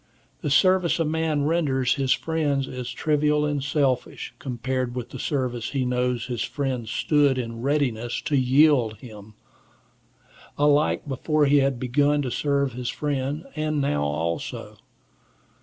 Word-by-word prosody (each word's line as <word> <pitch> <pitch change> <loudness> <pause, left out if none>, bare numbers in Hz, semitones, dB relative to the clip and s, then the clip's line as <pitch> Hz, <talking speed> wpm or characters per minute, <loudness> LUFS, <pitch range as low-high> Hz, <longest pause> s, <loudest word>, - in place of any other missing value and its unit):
The - - -2
service 185 +3 +3
a 165 - +2
man 155 -1 0
renders 140 -6 +1
his 135 -3 -1
friend 150 -4 0
is 125 -2 -6
trivial 150 -1 +1
and 145 -2 -1
selfish, 140 -3 -1
compared 130 0 -3
with 125 0 -5
the 130 - -7
service 125 -4 -2
he 135 -2 0
knows 125 -2 0
his 120 -3 -4
friend 130 -5 -3
stood 145 +1 +2
in 115 -2 -4
readiness 125 -4 0
to 145 - -1
yield 130 -3 +4
him, 105 -2 -12 1.2
alike 145 +1 +2
before 150 +3 +1
he 145 +1 +4
had 135 -2 +1
begun 145 +4 +2
to 125 - -3
serve 140 -1 0
his 125 0 -4
friend, 145 +1 -2
and 155 -1 -1
now 75 - 0
also. 80 +3 -3
135 Hz, 140 wpm, -24 LUFS, 125-150 Hz, 1.2 s, yield